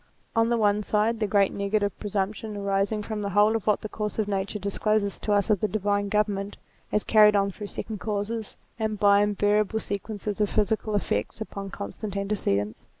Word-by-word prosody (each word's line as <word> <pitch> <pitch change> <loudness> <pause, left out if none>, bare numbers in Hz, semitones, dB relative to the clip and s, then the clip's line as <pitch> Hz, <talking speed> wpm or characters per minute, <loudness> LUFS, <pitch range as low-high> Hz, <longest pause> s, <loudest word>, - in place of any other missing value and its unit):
On 225 0 +3
the 235 - +2
one 210 -1 +2
side, 215 +2 +1
the 215 - +1
great 200 -1 +3
negative 200 0 0
presumption 210 +1 -3
arising 200 +1 0
from 215 0 -4
the 200 - -2
whole 205 +3 +4
of 225 - -3
what 210 - +3
the - - -4
course 210 0 -4
of 215 -2 0
nature 200 +1 -2
discloses 200 0 0
to 210 - -2
us 205 +1 +3
of 205 - +3
the 215 - +1
divine 205 0 0
government, 205 -1 0 0.3
as 210 - +1
carried 210 -1 +6
on 200 0 +2
through 205 +2 -7
second 215 +1 -5
causes 215 +1 -3 0.2
and 215 -1 -1
by 200 0 +5
invariable 205 +1 +2
sequences 205 0 -4
of 205 - +2
physical 215 0 0
effects 110 - -1
upon 200 -2 -6
constant 200 0 -6
antecedents. 110 - -1
205 Hz, 190 wpm, -26 LUFS, 200-215 Hz, 0.3 s, carried